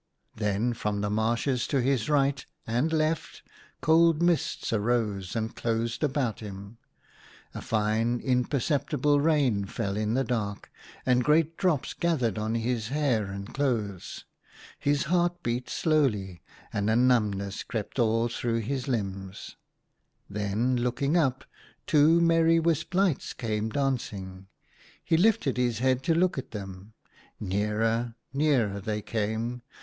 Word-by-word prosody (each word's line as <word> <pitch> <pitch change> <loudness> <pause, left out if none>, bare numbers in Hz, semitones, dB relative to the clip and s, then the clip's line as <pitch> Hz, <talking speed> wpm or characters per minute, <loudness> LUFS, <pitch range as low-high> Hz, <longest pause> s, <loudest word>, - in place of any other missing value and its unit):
Then 105 +2 0
from 105 -3 -2
the 105 0 -1
marshes 120 +4 0
to 140 - +1
his 130 0 +1
right 140 -2 +2 0.2
and 120 +8 0
left 155 0 -1 0.4
cold 165 0 +4
mists 170 -8 0
arose 105 -4 0
and 110 0 -2
closed 115 +3 -2
about 135 -6 0
him. 100 +1 -9 0.7
A - - -6
fine, 110 +2 0
imperceptible 140 +3 +1
rain 140 -10 +2
fell 100 0 -3
in 110 +2 0
the 135 - +2
dark, 105 -5 -3 0.3
and 125 -1 +3
great 155 +3 +3
drops 165 -8 0
gathered 130 - 0
on 110 +1 -1
his 115 -1 -1
hair 135 -5 +1
and 100 +2 -7
clothes. 110 -10 -2 0.5
His 145 0 +1
heart 175 +1 0
beat 120 +1 -2
slowly, 105 - 0 0.3
and 105 0 0
a 110 - +3
numbness 105 -6 +1
crept 110 +1 -5
through 120 - +4
all 115 +1 +1
his 120 +3 -2
limbs. 100 -5 -4 0.7
Then, 105 +5 0
looking 125 +5 0
up, 135 -7 +1 0.4
two 155 +3 +5
merry 165 0 +4
wisp 165 +1 0
lights 190 -6 +1
came 110 -2 -2
dancing. 100 -8 -3 0.6
He - - +2
lifted 170 - +2
his 120 -2 +1
head 130 +1 +1
to 165 - +3
look 175 -4 +2
at - - -8
them. 100 -1 -8 0.5
Nearer, 110 +4 0 0.2
nearer 135 -9 +1
they 105 0 -3
came. 110 +3 -2
120 Hz, 135 wpm, -27 LUFS, 105-145 Hz, 0.7 s, two